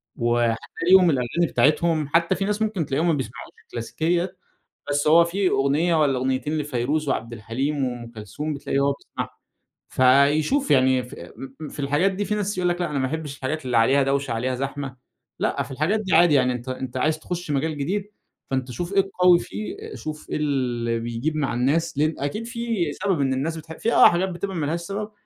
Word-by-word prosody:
وهتلاقيهم 120 +9 +3
الأغاني 140 +5 +1
بتاعتهم 155 +1 +2
حتى 170 +4 +2
في 195 - -2
ناس 210 +1 -1
ممكن 210 -8 0
تلاقيهم 155 +5 0
ما 165 - +3
بيسمعوش 125 -4 -5 0.2
الكلاسيكية، 170 +10 -2 0.5
بس 145 +1 +1
هو 165 +2 +7
في 185 +2 0
أغنية 150 +5 +2
والّا 135 -3 +2
أغنيتين 130 +4 -1
لفيروز 145 +1 -1
وعبد 115 -1 -2
الحليم 130 +6 -2
وأم 120 -2 -5
كلثوم 115 +9 -5
بتلاقي 140 -1 -2
هو 140 0 +2
بيسمعهم، - - -6 0.6
فيشوف 145 - +3
يعني 130 -1 +4
ف 125 - -11 0.2
م 135 0 -9
م - - -7
في - - -11
الحاجات 145 +8 +2
دي 205 +2 -3
في 210 - -1
ناس 205 -1 -2
يقول 180 -1 +1
لك 175 0 -1
لأ 175 - -1
أنا 140 - -1
ما 130 - 0
احبِّش 150 -2 -5
الحاجات 135 +2 -3
اللي 125 -2 +1
عليها 135 +5 +4
دوشة 135 -1 0
عليها 125 +3 -1
زحمة، 135 0 -4 0.4
لأ - - 0
في - - -11
الحاجات 155 +11 0
دي 190 -4 -2
عادي 170 -2 +6
يعني 125 -2 +3
أنت 125 +1 -6
أنت 130 0 -5
عايز 155 +4 +1
تخش 175 -1 -5
مجال 150 +2 -1
جديد 195 +8 -2 0.4
فأنت 130 -1 -1
شوف 175 +9 -4
إيه 200 - +4
القوي 180 -2 +4
فيه، 405 - -7
شوف 155 0 -7
إيه - - -1
اللي 120 -6 -1
بيجيب 120 +7 -3
مع 140 -3 -1
الناس، 140 +6 0
لأن 155 +1 +1
أكيد 210 +12 -3
في 230 - -2
سبب 190 -7 -1
إن 135 -1 +1
الناس 160 +5 -2
بتحب 160 +1 -9
في 230 - 0
آه - - +8
حاجات 180 +2 0
بتبقى 185 +2 -4
ما 155 - -1
لهاش 165 +3 -1
سبب، 205 +4 -5
150 Hz, 200 wpm, -23 LUFS, 130-175 Hz, 0.6 s, آه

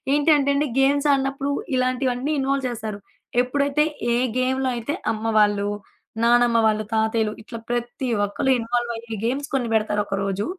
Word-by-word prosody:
ఏంటంటేండి 290 -1 +3 0.2
games 285 +2 +3
ఆడినప్పుడు 275 +1 -1 0.3
ఇలాంటివన్నీ 255 +2 0
involve 270 -1 0
చేస్తారు. 220 -3 -5 0.4
ఎప్పుడైతే 280 +3 +1 0.3
ఏ - - +2 0.2
గేమ్‌లో 260 +1 +1
అయితే 235 +5 -3 0.2
అమ్మ 220 0 -5
వాళ్ళు, 205 -1 +3 0.6
నానమ్మ 240 0 +4
వాళ్ళు, 215 0 +2
తాతయ్యలు 220 -1 +1
ఇట్లా 230 +1 -8
ప్రతి 240 +2 -2 0.2
ఒక్కరు 205 +6 0
ఇన్వాల్వయ్యే 235 -1 -3
గేమ్స్ 275 +4 -1
కొన్ని 250 -4 0
పెడతారు 210 -1 +1
ఒకరోజు. 195 0 -2
240 Hz, 130 wpm, -23 LUFS, 220-270 Hz, 0.6 s, నానమ్మ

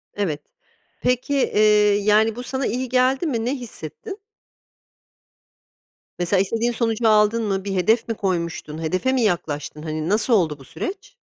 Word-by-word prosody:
Evet. 165 -8 -2 0.6
Peki, 250 +3 0
eee, 210 -5 +4
yani, 215 +1 +3
bu 245 - -6
sana 265 +1 -3
iyi 250 +1 -2
geldi 260 +4 +2
mi? 235 -7 -1
Ne 260 - 0
hissettin? 250 - -8 2.0
Mesela 180 +2 +2
istediğin 230 +4 0
sonucu 225 -1 0
aldın 215 +2 +3
mı? 195 -2 -1
Bir 195 - -2
hedef 220 +6 +2
mi 230 - -1
koymuştun? 170 -5 -3
Hedefe 185 +11 0
mi 260 - +1
yaklaştın? 150 -7 -2
Hani, 155 +1 -3
nasıl 215 +4 +2
oldu 160 -9 +2
bu - - -13
süreç? 405 +4 -7
215 Hz, 150 wpm, -22 LUFS, 185-250 Hz, 2.0 s, eee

